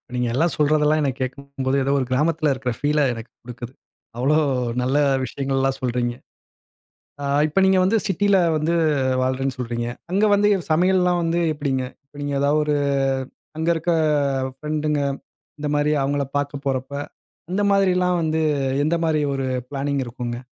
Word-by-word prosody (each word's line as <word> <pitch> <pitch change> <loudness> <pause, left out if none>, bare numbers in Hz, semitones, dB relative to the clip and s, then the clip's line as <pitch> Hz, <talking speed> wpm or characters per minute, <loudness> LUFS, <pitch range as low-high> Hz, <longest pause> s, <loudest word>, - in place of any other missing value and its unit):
நீங்க 125 0 0
எல்லாம் 160 +7 +1
சொல்றதெல்லாம் 150 +1 +3
எனக்கு 135 -2 -1
கேட்கும்போது, 135 0 -3
ஏதோ 135 - 0
ஒரு 130 - -1
கிராமத்தில 155 +2 +2
இருக்கிற 130 -1 -3
ஃபீல 150 +1 +1
எனக்கு 115 0 -9
கொடுக்குது. 120 +1 -8 0.4
அவ்வளோ 135 +5 +2 0.5
நல்ல 130 +3 +1 0.3
விஷயங்கள்லாம் 135 0 -1
சொல்றீங்க. 120 -1 -1 1.1
ஆ - - -3 0.2
இப்ப 155 +5 0
நீங்க 190 0 +4
வந்து 200 +5 +3
சிட்டில 200 +2 +2 0.2
வந்து 155 +2 0 0.5
வாழ்றேனு 130 +1 -1
சொல்றீங்க. 120 -1 -3 0.2
அங்க 200 +3 +2
வந்து 205 +1 +4 0.2
சமையல்லாம் 180 +1 +3
வந்து 165 +1 0
எப்டிங்க? 140 -3 -1 0.2
இப்ப 140 - -30
நீங்க 145 0 -2
ஏதாஒரு 150 +1 +2 0.8
அங்க 160 +1 -2
இருக்க 165 +2 -1 0.7
பிரெண்ட்ங்க, 150 -1 -1 0.6
இந்த 150 - -2
மாரி 145 +1 +2
அவங்களை 140 +1 0
பார்க்க 145 0 -3
போறப்போ, 135 +1 -2 0.5
அந்த 195 +3 0
மாரிலாம் 180 -2 +2
வந்து 160 0 0 0.4
எந்த 170 - +1
மாரி 155 -2 +1
ஒரு 135 -1 -2 0.2
பிளானிங் 140 0 -1
இருக்குங்க? 120 0 -5
145 Hz, 140 wpm, -22 LUFS, 130-160 Hz, 1.1 s, நீங்க